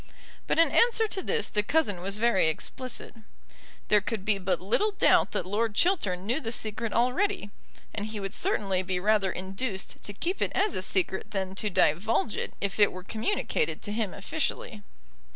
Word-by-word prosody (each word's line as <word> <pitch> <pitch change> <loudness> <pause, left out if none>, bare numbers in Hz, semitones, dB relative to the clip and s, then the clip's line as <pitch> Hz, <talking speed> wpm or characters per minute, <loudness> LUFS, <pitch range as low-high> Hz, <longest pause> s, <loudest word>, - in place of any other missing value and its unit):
But - - +1
in 330 - +5
answer 460 -2 +4
to 395 -2 -3
this 460 +4 0
the 210 - +1
cousin 210 - 0
was 195 +2 -1
very 225 -6 +3
explicit. 255 +10 -4 0.8
There 210 -1 +5
could 210 -1 -4
be 210 -2 +2
but 185 0 0
little 220 - +2
doubt 405 - +4
that - - -1
Lord 210 +3 -1
Chiltern 205 - +1
knew 240 +8 0
the 225 -4 -3
secret 220 -1 -2
already; 250 - +1 0.4
and 210 -1 -3
he 215 -1 -5
would 195 0 -4
certainly 195 - +1
be 185 -1 -2
rather 205 0 +2
induced 190 +2 -4
to - - -6
keep 340 - -3
it - - +1
as 410 0 +2
a - - -2
secret 190 0 0
than 190 -2 -3
to 210 +2 -2
divulge 200 +5 +2
it - - -4
if 200 +1 -3
it 205 - +6
were 185 0 -8
communicated 410 - -1
to 205 - -4
him 215 -3 -1
officially. 215 0 -3
210 Hz, 185 wpm, -28 LUFS, 195-255 Hz, 0.8 s, it